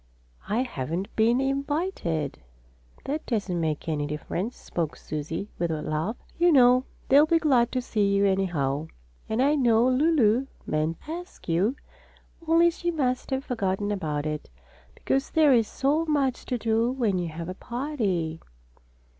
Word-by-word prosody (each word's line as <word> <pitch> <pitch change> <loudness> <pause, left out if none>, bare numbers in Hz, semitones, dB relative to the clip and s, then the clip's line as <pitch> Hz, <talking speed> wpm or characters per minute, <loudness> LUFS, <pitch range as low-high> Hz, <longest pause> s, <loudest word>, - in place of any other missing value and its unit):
"I 225 +5 +1
haven't 170 - -4
been 230 +3 +3
invited." 275 - -1 0.7
"That 300 +3 -2
doesn't 200 -7 -1
make 155 -1 -2
any 150 -2 -1
difference," 170 +9 -4
spoke 165 -3 -3
Susie 160 +6 -5
with 170 0 0
a 155 -1 -2
laugh. 155 +10 -2 0.2
"You 350 0 +5
know 255 -2 +6 0.2
they'll 290 +3 +6
be 330 - +4
glad 260 -7 +3
to 255 -1 -1
see 200 -4 +1
you, 200 0 +3
anyhow. 160 -7 0 0.4
And 225 +4 +1
I 285 +2 +4
know 240 -4 +4
Lulu 260 -3 +3 0.2
meant 155 +2 -1
to 305 - -6
ask 355 +2 -8
you, 185 +9 +1 0.7
only 335 +1 +5
she 345 +1 -3
must 260 -6 -1
have 265 0 -2
forgotten 205 -3 -1
about 155 -7 -2
it, 150 -1 -4 0.5
because 270 +1 -1
there 305 -4 +5
is 230 -3 +3
so 295 +4 0
much 275 -4 0
to 250 - -1
do 225 +1 +1
when 225 -8 0
you 175 - -2
have 165 +1 -6
a 185 - -4
party." 205 - -2
225 Hz, 155 wpm, -26 LUFS, 170-270 Hz, 0.7 s, know